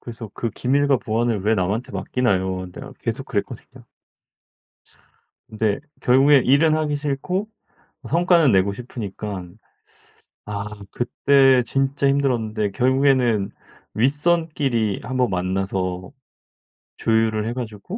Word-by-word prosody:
그래서 115 -2 -8
"그 115 - -3
기밀과 140 +2 +1
보안을 115 -1 -1
왜 110 +2 +2
남한테 100 +4 -2
맡기나요?" 95 -7 -1
내가 - - -9
계속 - - -4
그랬거든요. - - -4
참. - - -16 1.8
네. 110 0 +1 0.2
결국엔 135 +2 +5
일은 155 +4 +4
하기 150 -2 0
싫고 150 +8 -2 0.6
성과는 170 -3 +4
내고 100 0 +2
싶으니깐. 100 -5 -7 0.9
아. 100 -1 -4 0.3
그때 130 +1 +3
진짜 135 +3 0
힘들었는데 115 -7 0
결국에는 130 -4 +2 0.4
윗선끼리 140 - +1
1 130 0 -4
번 125 -2 +2
만나서 95 0 -2 0.9
조율을 110 -1 +1
해 115 - -2
가지고 120 - -6
120 Hz, 255 characters per minute, -22 LUFS, 105-140 Hz, 1.8 s, 결국엔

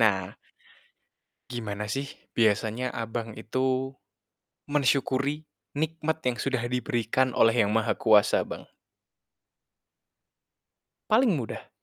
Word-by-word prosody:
nah 95 -4 +2 1.2
gimana 105 -3 -4
sih 135 +4 -2 0.3
biasanya 110 +3 +1
Abang 115 -1 -4
itu 130 +3 -1 0.7
mensyukuri 140 +1 +1 0.2
nikmat 160 +1 -2
yang 120 - -3
sudah 130 -2 -1
diberikan 125 +1 0
oleh 115 -1 +4
Yang 105 - -1
Maha 110 -1 +1
Kuasa, 105 -3 +4
Bang? - - -8 2.4
Paling 225 -1 +4
mudah. 125 -8 -5
125 Hz, 90 wpm, -27 LUFS, 110-140 Hz, 2.4 s, oleh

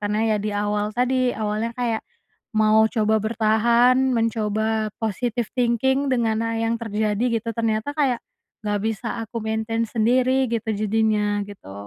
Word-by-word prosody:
karena 210 0 -1
ya 215 - +2
di - - 0
awal 205 0 0
tadi 255 +1 +2
awalnya 215 +2 -1
kayak, 235 -3 -1 0.6
mau 215 0 +4 0.2
coba 220 -1 +2
bertahan 235 +3 +3 0.2
mencoba 220 -1 0
positive 230 +1 -2
thinking 265 +3 +1
dengan 230 -3 +1
hal 230 0 -2
yang 225 0 +1
terjadi 215 0 -1 0.2
gitu 230 - -8
ternyata 225 +3 -1
kayak, 275 -5 +1 0.5
nggak 205 -1 0
bisa 225 +1 -3
aku 225 +1 -9
maintain 220 +1 -1
sendiri 255 +4 +2
gitu 230 -1 -2
jadinya 210 -1 +1
gitu. 195 - -11
220 Hz, 140 wpm, -23 LUFS, 215-235 Hz, 0.6 s, mau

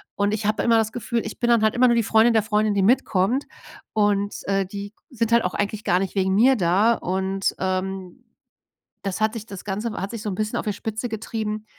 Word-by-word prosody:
und 205 +1 +1
ich 215 -1 -3
habe 215 +1 +1
immer 230 -1 +4
das 220 0 0
Gefühl, 235 0 -2
ich 220 - -7
bin 240 - +1
dann 235 -2 +4
halt 220 0 +2
immer 250 +1 +5
nur 235 - +3
die 230 - +2
Freundin 225 +2 +4
der 220 -2 +3
Freundin, 215 -1 +1
die 195 - +2
mitkommt 225 +2 +2 0.5
und, 205 -1 +1
äh, 195 -1 +1
die 200 +1 -7
g - - -56 0.2
sind 230 -1 -1
halt 235 - +5
auch 180 - -2
eigentlich 205 +1 -2
gar 180 +1 +2
nicht 195 +1 -3
wegen 190 0 +1
mir 255 +6 +5
da 195 +5 +3
und, 190 +1 -1
ähm, 185 -1 -3 0.8
das 195 +1 -3
hat 215 0 +2
sich 225 -2 -7
das 195 -4 -9
Ganze 210 +3 -3
hat 195 -1 -4
sich 230 - -5
so 215 - -4
'n - - -3
bisschen 215 +2 -2
auf - - -5
der 210 - +1
Spitze 220 +2 -4
getrieben, 215 -1 -4
210 Hz, 240 wpm, -23 LUFS, 195-225 Hz, 0.8 s, immer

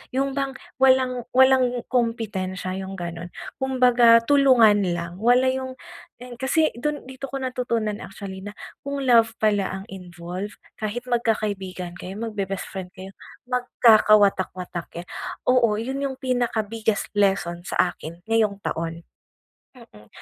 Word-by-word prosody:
yung 275 +1 +1
bang 275 -1 -2 0.2
walang 260 -2 +3
walang 255 -2 +4
kompetensya, 205 -7 -1
yung 190 0 -6
ganon. 170 0 -6 0.3
Kumbaga 245 -3 +5
tulungan 235 -8 +5
lang, 170 +2 -6
wala 245 +3 +4
yung 260 0 -4 0.5
yung 245 -1 -9
kasi 310 +4 +2
dun 300 +2 -2
dito 265 +1 -7
ko - - -5
natutunan 245 -5 -2
actually 195 -1 -8
na 205 +1 -8 0.3
kung 280 0 -4
love 230 -2 +4
pala 205 -3 +1
ang - - -11
involve, 180 +2 -7 0.2
kahit 220 +3 -3
magkakaibigan 200 -7 -2
kayo, 185 +2 -7
magbe-best 200 -4 -3
friend 185 -1 -7
kayo 190 +1 -9 0.3
magkakawatak-watak 210 -7 +3
kayo, 170 +1 -7 0.4
oo 245 -4 +4
yun 265 +4 -3
yung 270 -1 -2
pinaka-biggest 225 -4 -1
lesson 195 -4 +1
sa 180 - +2
akin 165 +2 -10
ngayong 215 -3 +1
taon. 165 0 -4 0.7
Mm, 220 - -17
225 Hz, 130 wpm, -24 LUFS, 190-250 Hz, 0.7 s, Kumbaga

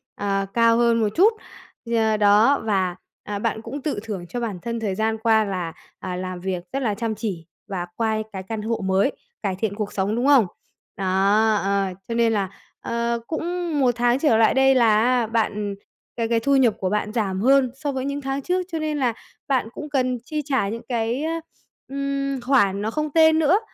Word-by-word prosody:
à, 195 -1 -1
cao 230 0 +4
hơn 235 -1 +3
một 215 - +2
chút 425 +6 +5 0.5
gì 235 0 -1
à, 220 -1 +2
đó 210 +7 +5
và, 190 -5 0 0.3
à, 205 -1 -4
bạn 220 0 -1
cũng 265 +5 -6
tự 290 -8 -2
thưởng 200 -6 -5
cho 245 - -4
bản 210 -6 -3
thân 235 0 -3
thời 205 -4 -2
gian 220 +1 0
qua 220 -1 +3
là, 180 -4 -3 0.3
à, 180 -1 -4
làm 185 0 -5
việc 185 -1 -3
rất 275 -1 -1
là 215 -3 +1
chăm 225 0 -2
chỉ 195 -7 -4 0.2
và 185 -3 -3
qua 220 -1 0 0.2
cái 190 -1 -5
căn 215 +2 -5
hộ 225 0 -2
mới, 190 +7 +2 0.3
cải 190 -2 -1
thiện 200 +1 -2
cuộc 210 -1 -4
sống, 200 +3 0
đúng 250 +4 0
không? 270 -7 +6 0.5
Đó, 195 - -3 0.6
ờ, 200 0 +1 0.2
cho 230 - -3
nên 230 -1 +3
là, 195 -3 0 0.3
ờ, 235 0 -1
cũng 340 -1 -2
1 255 -3 +4
tháng 240 +2 +2
trở 275 -7 +3
lại 225 - +4
đây 270 0 +4
là 220 -4 +4
á 245 -2 +2
bạn 210 -3 -1 0.4
cái 230 -1 -1
cái 230 0 +2
thu 280 +4 +2
nhập 245 -5 +4
của 185 - -1
bạn 210 +1 -1
giảm 195 -5 -1
hơn 265 +1 +4
so 290 +1 -3
với 265 -1 -3
những 280 +1 -3
tháng 270 +1 -2
trước, 365 +5 0
cho 325 - -2
nên 310 -1 -2
là 250 -4 +1 0.3
bạn 255 -5 +1
cũng 300 -1 -7
cần 255 -3 0
chi 305 +3 -3
trả 265 -9 0
những 230 +2 -5
cái, 235 +4 -1
ơ, 320 - -1 0.6
ừm, 275 -1 -2
khoản 205 -6 +2
nó 220 - -2
không 305 +4 -2
tên 320 -1 +5
nữa, 330 +7 +4
230 Hz, 215 wpm, -23 LUFS, 205-270 Hz, 0.6 s, không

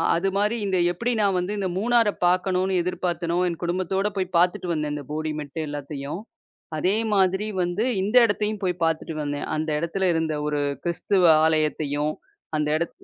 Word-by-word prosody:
அது 185 +4 +1
மாரி 210 +3 +2
இந்த 190 -2 +1
எப்படி 235 +8 -1
நான் 195 -2 +2
வந்து, 180 +3 -2
இந்த 190 - 0
மூணார 230 +1 +3 0.2
பாக்கணுன்னு 185 +1 +2
எதிர்பார்த்தேனோ, 175 -1 -2
என் 170 -2 -3
குடும்பத்தோட 185 +3 0
போய் 185 -2 -2
பாத்துட்டு 180 +2 +2
வந்தேன், 150 -2 -1
அந்த 145 -1 -5
போடி 155 +1 -2
மெட்டு 150 +2 -6
எல்லாத்தையும் 145 +3 -5 0.6
அதே 185 +6 +2 0.2
மாதிரி 190 +1 +2 0.2
வந்து 175 +5 0 0.2
இந்த 205 +5 -1
இடத்தையும் 210 -1 -1
போய் 180 -2 -1
பாத்துட்டு 165 0 -1
வந்தேன். 145 0 -3
அந்த 155 +1 -2
இடத்துல 180 +3 0
இருந்த 160 -1 0
ஒரு 150 -1 -1 0.2
கிறிஸ்தவ 180 +2 +1 0.2
ஆலயத்தையும் 155 -1 +1 0.4
அந்த 150 -1 0
இடத்து 170 +1 -5
175 Hz, 160 wpm, -24 LUFS, 155-195 Hz, 0.6 s, மூணார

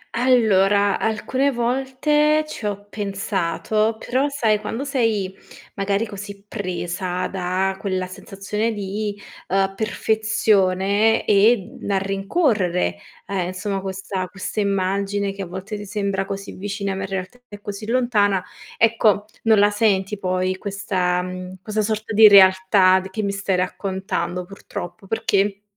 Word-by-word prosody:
Allora, 205 -5 +3
alcune 255 +5 0
volte 270 +5 +1
ci 230 -8 -5
ho 205 0 -4
pensato, 205 +1 -1
però 260 +5 0
sai 225 -7 +1
quando 225 +5 -4
sei 225 -9 0 0.4
magari 200 +2 0
così 200 -1 -9
presa 180 -1 -3
da 190 +1 -1
quella 185 -2 -2
sensazione 200 +4 -4
di, 205 +1 -4 0.3
ehm, 195 0 +1
perfezione 215 -1 +2
e, 210 0 +3
mhmm, - - -5
a 195 - +2
rincorrere, 195 - 0 0.3
ehm, 185 -3 -2
insomma, 190 +1 -3
questa 190 -1 -4
questa 190 +3 -5
immagine 200 0 0
che 195 - -7
a 190 - -4
volte 190 +4 -6
ti 205 - -7
sembra 200 -2 -1
così 195 0 -6
vicina 200 0 -4
ma 190 - -4
in 190 - -3
realtà 190 +5 -5
è 205 -1 -10
così 205 +1 -7
lontana, 215 -6 +2 0.3
ecco 220 -2 +3 0.2
non 220 -2 +5
la 205 +1 +5
senti 205 -1 +1
poi 185 0 -1
questa, 190 -3 -1
mhmm 185 0 -7
questa 215 0 -1
sorta 215 +1 -2
di 215 +1 +9
realtà 190 -1 +6
d 190 +1 -8
che 215 +2 -3
mi 200 - 0
stai 200 -1 -1
raccontando, 185 -1 -2
purtroppo; 185 -1 -8
perché, 205 -2 0
200 Hz, 135 wpm, -22 LUFS, 190-215 Hz, 0.4 s, di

